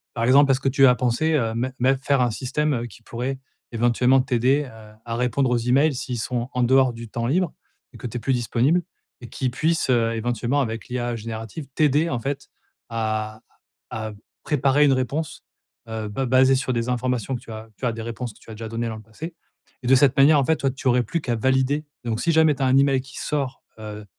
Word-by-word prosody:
Par 115 Hz, -1 st, -1 dB
exemple, 140 Hz, +3 st, +5 dB
est-ce 135 Hz, 0 st, +3 dB
que 135 Hz, -, 0 dB
tu 135 Hz, +1 st, +5 dB
as 125 Hz, -, +6 dB
pensé, 125 Hz, +6 st, 0 dB
heu, 115 Hz, -6 st, +1 dB
mett 125 Hz, +3 st, -2 dB
mett 130 Hz, +2 st, +2 dB
faire 140 Hz, -2 st, +2 dB
un 125 Hz, -1 st, +2 dB
système, 145 Hz, +5 st, -1 dB
heu, 120 Hz, 0 st, -2 dB
qui 115 Hz, +1 st, -14 dB
pourrait 125 Hz, +4 st, -4 dB, 0.3 s
éventuellement 120 Hz, +3 st, +3 dB
t'aider, 130 Hz, +2 st, +2 dB
heu, 110 Hz, -1 st, -14 dB
à 115 Hz, 0 st, -4 dB
répondre 125 Hz, +2 st, +1 dB
aux 125 Hz, -, +3 dB
emails, 135 Hz, +6 st, +2 dB
s'ils 125 Hz, -1 st, -4 dB
sont 120 Hz, +2 st, -2 dB
en 125 Hz, -, 0 dB
dehors 130 Hz, 0 st, +4 dB
du 115 Hz, 0 st, -9 dB
temps 115 Hz, +2 st, -3 dB
libre, 170 Hz, +5 st, +1 dB, 0.4 s
et -, -, -13 dB
que -, -, -7 dB
tu 120 Hz, -, -6 dB
es -, -, -3 dB
plus 135 Hz, -, 0 dB
disponible, 125 Hz, +7 st, +1 dB, 0.4 s
et 120 Hz, -, -10 dB
qui 130 Hz, +2 st, -2 dB
puisse, 160 Hz, +6 st, 0 dB
heu, 115 Hz, -2 st, +2 dB
éventuellement, 120 Hz, +4 st, -1 dB
avec 115 Hz, -3 st, -3 dB
l'IA 120 Hz, -1 st, -2 dB
générative, 115 Hz, +6 st, -6 dB
t'aider, 150 Hz, +2 st, +3 dB
en 125 Hz, -, -1 dB
fait, 135 Hz, +4 st, -4 dB, 0.4 s
à 110 Hz, -1 st, -3 dB, 0.5 s
à 110 Hz, -1 st, -4 dB, 0.3 s
préparer 145 Hz, 0 st, +3 dB
une 140 Hz, -, +5 dB
réponse, 135 Hz, +4 st, -2 dB, 0.4 s
heu, 110 Hz, -1 st, -4 dB
ba 130 Hz, +6 st, -2 dB
basée 130 Hz, +1 st, +5 dB
sur 130 Hz, 0 st, -1 dB
des 120 Hz, 0 st, -1 dB
informations 125 Hz, 0 st, -1 dB
que -, -, -9 dB
tu 120 Hz, -, -14 dB
as 110 Hz, +1 st, -8 dB
tu -, -, -8 dB
as 115 Hz, -, +1 dB
des 115 Hz, -, -6 dB
réponses 115 Hz, +1 st, -5 dB
que -, -, -22 dB
tu -, -, -15 dB
as 110 Hz, -, -7 dB
déjà 110 Hz, +1 st, -7 dB
données 115 Hz, +1 st, -3 dB
dans 110 Hz, -, -5 dB
le 110 Hz, -, -10 dB
passé? 135 Hz, +11 st, -9 dB, 0.5 s
Et 120 Hz, -, -6 dB
de 135 Hz, -, +6 dB
cette 135 Hz, 0 st, +4 dB
manière, 145 Hz, +2 st, +6 dB
en 140 Hz, -, +2 dB
fait, 160 Hz, +3 st, +2 dB
toi, 135 Hz, -, 0 dB
tu 135 Hz, +1 st, -3 dB
aurais 125 Hz, 0 st, +4 dB
plus 165 Hz, +10 st, -2 dB
qu'à 120 Hz, -6 st, -2 dB
valider. 130 Hz, +5 st, +1 dB, 0.2 s
Donc, 115 Hz, -1 st, -2 dB
si 170 Hz, -, +1 dB
jamais 160 Hz, -2 st, +4 dB
tu 135 Hz, -, -5 dB
as -, -, +3 dB
un 130 Hz, -, +4 dB
email 135 Hz, -1 st, +4 dB
qui 130 Hz, +1 st, -11 dB
sort, 140 Hz, -4 st, -3 dB, 0.2 s
heu, 105 Hz, -1 st, -8 dB
125 Hz, 235 wpm, -23 LUFS, 115-135 Hz, 0.5 s, as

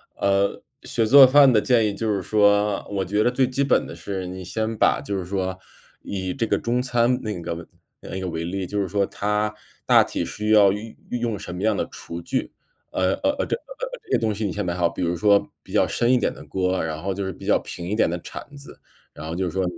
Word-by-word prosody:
呃， 100 Hz, 0 st, +1 dB, 0.2 s
学 115 Hz, -, 0 dB
做 135 Hz, +4 st, +9 dB
饭 135 Hz, +1 st, +7 dB
的 110 Hz, -, +5 dB
建 115 Hz, -3 st, +3 dB
议 100 Hz, -, -2 dB
就 110 Hz, +1 st, -1 dB
是 100 Hz, -, -1 dB
说， 105 Hz, +1 st, +2 dB
我 100 Hz, -1 st, -1 dB
觉 105 Hz, +4 st, +1 dB
得 120 Hz, -, +3 dB
最 130 Hz, 0 st, +2 dB
基 130 Hz, +2 st, 0 dB
本 140 Hz, -, +2 dB
的 -, -, -8 dB
是 95 Hz, +2 st, -5 dB
你 95 Hz, +1 st, -7 dB
先 110 Hz, +4 st, -2 dB
把 -, -, +3 dB
就 100 Hz, -1 st, -3 dB
是 95 Hz, -, -4 dB
说 95 Hz, 0 st, -2 dB, 0.4 s
以 95 Hz, -2 st, -4 dB
这 115 Hz, -, -1 dB
个 -, -, +1 dB
中 120 Hz, +1 st, 0 dB
餐 125 Hz, 0 st, +1 dB
那 105 Hz, -5 st, -4 dB
个 85 Hz, 0 st, -5 dB, 0.3 s
那 95 Hz, -, -6 dB
个 95 Hz, -, -4 dB
为 80 Hz, -1 st, -3 dB
例， 95 Hz, +2 st, -3 dB
就 105 Hz, +3 st, -2 dB
是 100 Hz, -, 0 dB
说 100 Hz, +1 st, +1 dB
它 105 Hz, +2 st, -1 dB, 0.3 s
大 -, -, +6 dB
体 -, -, -3 dB
需 105 Hz, +1 st, -3 dB
要 105 Hz, -2 st, +7 dB
运 105 Hz, +3 st, -6 dB
运 125 Hz, -, -2 dB
用 115 Hz, -3 st, -1 dB
什 90 Hz, -, -7 dB
么 90 Hz, -, -6 dB
样 110 Hz, -1 st, +2 dB
的 -, -, -2 dB
厨 85 Hz, +1 st, -7 dB
具， -, -, -2 dB, 0.4 s
呃 95 Hz, 0 st, +1 dB
呃 285 Hz, -, +4 dB
呃， -, -, +1 dB
这 -, -, -1 dB
呃， -, -, -8 dB
这 -, -, -15 dB
些 -, -, +4 dB
东 110 Hz, -2 st, 0 dB
西 105 Hz, +1 st, -3 dB
你 100 Hz, -, -1 dB
先 105 Hz, +3 st, -3 dB
买 85 Hz, -, -1 dB
好， 85 Hz, -1 st, +2 dB
比 85 Hz, -, -6 dB
如 85 Hz, 0 st, 0 dB
说 100 Hz, +3 st, +3 dB
比 -, -, -13 dB
较 -, -, +3 dB
深 120 Hz, +1 st, +1 dB
一 -, -, +5 dB
点 -, -, 0 dB
的 75 Hz, -, -12 dB
锅， 90 Hz, +4 st, -1 dB
然 80 Hz, -1 st, -4 dB
后 95 Hz, +2 st, -2 dB
就 100 Hz, +1 st, -3 dB
是 95 Hz, -, -4 dB
比 -, -, -12 dB
较 -, -, +4 dB
平 85 Hz, -, -7 dB
一 105 Hz, -, 0 dB
点 110 Hz, -, +3 dB
的 85 Hz, +1 st, -3 dB
铲 145 Hz, -, -9 dB
子， 140 Hz, 0 st, -12 dB, 0.3 s
然 -, -, -9 dB
后 80 Hz, -, -4 dB
就 95 Hz, +1 st, -1 dB
是 90 Hz, -, -2 dB
说 95 Hz, +2 st, -1 dB
100 Hz, 280 characters per minute, -23 LUFS, 95-115 Hz, 0.4 s, 做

